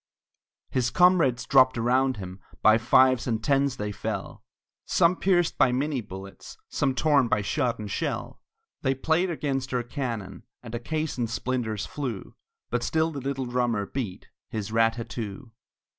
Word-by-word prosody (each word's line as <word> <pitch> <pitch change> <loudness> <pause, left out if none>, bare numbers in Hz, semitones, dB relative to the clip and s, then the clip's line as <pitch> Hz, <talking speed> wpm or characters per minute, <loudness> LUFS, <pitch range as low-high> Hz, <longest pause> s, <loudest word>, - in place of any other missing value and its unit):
His 125 -1 +1
comrades 165 -8 +4
dropped 130 -2 +5
around 130 +2 +2
him, 95 -1 -8 0.2
By 110 +1 +6
fives 130 +2 +4
and 115 -2 -1
tens 140 -2 +2
they 105 0 -3
fell, 100 - -5 0.4
Some 170 +2 +3
pierced 175 -3 +1
by 125 - +5
minie 135 +1 -1
bullets, 95 -1 -10
Some 135 -2 0
torn 140 -1 +3
by 115 -3 +1
shot 120 +2 0
and 105 - -6
shell; - - -3 0.4
They 135 -1 +1
played 160 +7 +1
against 135 -5 -2
our 120 - 0
cannon, 120 -6 -5 0.2
And 115 -1 -9
a 120 - -2
caisson's 130 -4 -2
splinters 115 -5 -2
flew; 125 -10 -5 0.4
But 120 0 0
still 160 +5 +1
the 140 -3 -5
little 135 0 -2
drummer 120 -4 0
beat 110 -6 -5 0.2
His 110 -1 -4
rat 115 0 +3
tat 115 0 -6
too! 115 +1 -6
125 Hz, 160 wpm, -26 LUFS, 115-140 Hz, 0.4 s, By